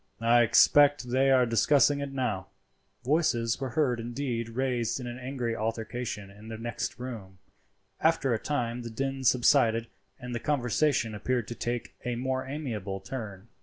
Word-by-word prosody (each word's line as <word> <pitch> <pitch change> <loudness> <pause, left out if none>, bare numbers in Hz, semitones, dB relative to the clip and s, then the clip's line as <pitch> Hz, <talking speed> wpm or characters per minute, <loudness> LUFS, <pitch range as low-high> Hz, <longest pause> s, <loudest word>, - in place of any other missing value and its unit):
I 120 +1 +5
expect 145 +2 +5
they 135 +2 +3
are 130 -2 +5
discussing 140 +5 +3
it 140 -1 -4
now." 115 -9 -2 0.6
Voices 130 -5 +1
were 135 0 +1
indeed 120 0 -3
heard 115 - -11
raised 125 -2 0
in 125 - -6
angry 120 -1 -4
altercation 110 -2 -4
in 105 +2 -14
the 110 0 -6
next 120 +1 -4
room. 110 -7 -8 0.6
After 160 -6 +2
a 110 - 0
time 125 -4 -2
the 120 - -6
din 135 +3 -3
subsided 120 -2 +4 0.3
and 125 -1 -6
the 120 - -2
conversation 125 -2 +1
appeared 115 +2 -1
to - - -3
take 120 0 -4
a 125 0 -2
more 130 +2 -1
amiable 115 -10 -4
turn. 105 -1 -7
120 Hz, 155 wpm, -28 LUFS, 115-135 Hz, 0.6 s, I